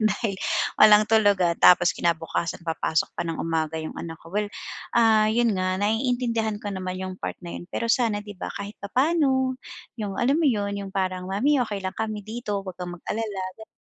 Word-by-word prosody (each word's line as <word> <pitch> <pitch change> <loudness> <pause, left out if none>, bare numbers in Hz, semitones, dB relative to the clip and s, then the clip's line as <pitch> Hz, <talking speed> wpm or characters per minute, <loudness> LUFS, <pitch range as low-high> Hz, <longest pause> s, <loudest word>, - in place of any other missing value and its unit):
Dahil 215 -1 0 0.4
walang 210 0 +8
tulugan. 210 -3 +3 0.2
Tapos 175 -1 +7
kinabukasan 170 0 -1
papasok 160 -1 0
pa - - -1
ng 165 - -2
umaga 160 -1 -1
yung 160 -1 -4
anak 165 -1 -6
ko. 165 - -13
Well, 210 +2 0 0.5
ah, 220 -2 +5
'yon 225 -3 +2
nga 185 0 0
naiintindihan 225 +1 0
ko 205 - -3
naman 185 -1 -4
yung 185 0 -4
part - - -4
na 175 - -7
'yon - - -10
pero 230 +5 -2
sana 225 -4 +1
'di 205 -2 -11
ba - - -4
kahit 200 +1 -7
papaano 260 +2 +1 0.4
yung 205 -3 -3
alam 270 +8 +2
mo 330 - +3
'yon 205 -5 0
yung 195 -1 -7
parang, 185 -1 -1
"Mommy 260 +10 +2
okey 205 -3 -4
lang 190 0 -4
kami 215 -2 -3
dito 215 -2 -4
wag 185 -2 -8
kang 175 -1 -5
mag-alala." 205 +2 -4 0.2
Gano'n. 220 - -14
205 Hz, 190 wpm, -25 LUFS, 185-225 Hz, 0.5 s, walang